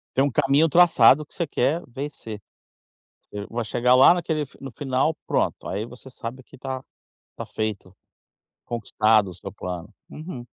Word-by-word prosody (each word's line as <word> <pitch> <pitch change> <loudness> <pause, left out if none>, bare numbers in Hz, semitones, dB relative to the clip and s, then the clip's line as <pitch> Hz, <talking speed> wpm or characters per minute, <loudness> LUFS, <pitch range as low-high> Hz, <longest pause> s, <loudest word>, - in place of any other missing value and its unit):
Tem 135 - +4
um 140 - +1
caminho 145 +3 +3
traçado 150 -4 +6
que - - -21
você 170 - -2
quer 145 +5 +1
vencer. 120 -5 -7 0.8
Você 100 0 -8
vai 115 0 -3
chegar 125 +3 +3
lá 135 +6 +8
naquele 160 -3 -1
f 140 - -8
no 135 -2 -7
final, 135 +3 0
pronto. - - -1
Aí 105 +4 -3
você 125 +2 -12
sabe 125 +1 -8
que - - -16
tá 130 0 -5 0.6
tá - - -6
feito, 105 -4 -4 0.7
conquistado 110 -3 +2
o - - -9
seu 100 - -8
plano, 90 -2 -6 0.2
uhum. 150 -6 -8
130 Hz, 165 wpm, -24 LUFS, 110-145 Hz, 0.8 s, lá